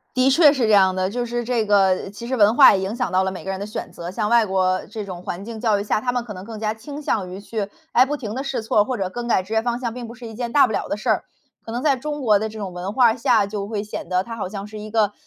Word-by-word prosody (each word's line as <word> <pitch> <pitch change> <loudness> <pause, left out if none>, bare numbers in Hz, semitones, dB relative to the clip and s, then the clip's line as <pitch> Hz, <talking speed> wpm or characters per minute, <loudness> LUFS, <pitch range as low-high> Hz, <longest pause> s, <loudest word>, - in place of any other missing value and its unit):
的 255 +1 +4
确 290 +1 +6
是 260 -5 +1
这 215 - +2
样 190 -2 +5
的。 185 0 0
就 240 +3 -2
是 240 0 -2
这 235 -2 0
个， 195 -2 +2
其 230 +3 -9
实 260 +1 -1
文 210 0 +5
化 270 -6 +8
也 190 - 0
影 195 +4 -3
响 245 -7 -2
到 190 0 +2
了 190 - -1
每 185 - -8
个 195 - -4
人 190 - -3
的 200 - -5
选 215 - -6
择。 170 +1 -7
像 210 +2 -2
外 235 0 +5
国 185 -1 0
这 215 -2 -5
种 180 -3 -8
环 180 +1 -5
境 225 -1 -7
教 215 -4 +2
育 - - -4
下， 210 - 0
他 245 +2 -1
们 245 -1 -1
可 210 -4 -8
能 185 +1 -9
更 220 -1 -8
加 215 0 -1
倾 280 +6 -8
向 190 -9 -1
于 190 - -7
去， 210 -1 -4 0.2
哎， 250 - +6
不 290 +3 -2
停 220 -6 -6
地 265 +2 -3
试 275 -5 -2
错 215 -1 +2
儿， - - +4
或 255 +1 -3
者 190 -2 -1
更 240 +5 -6
改 225 -5 +2
职 200 +4 -6
业 220 - +2
方 240 0 -1
向， 235 -2 -4
并 245 -2 -6
不 235 - -10
是 240 0 -10
一 225 - -8
件 235 0 -4
大 285 -1 +6
不 220 - -4
了 - - -2
的 - - -1
事 220 +3 -6
儿。 215 - +2 0.4
可 225 - -7
能 245 +2 -3
在 285 -3 +3
中 295 +3 -5
国 215 -5 +4
的 220 +2 -2
这 220 0 -9
种 195 -3 -5
文 180 +3 -4
化 235 -1 +4
下， 230 -4 +3
就 200 -1 -4
会 210 -2 -2
显 210 - -7
得 185 0 +1
它 230 +2 -7
好 200 - -4
像 200 -1 -6
是 215 0 -9
一 215 0 -8
个， 210 -2 +2
220 Hz, 360 characters per minute, -22 LUFS, 200-240 Hz, 0.4 s, 化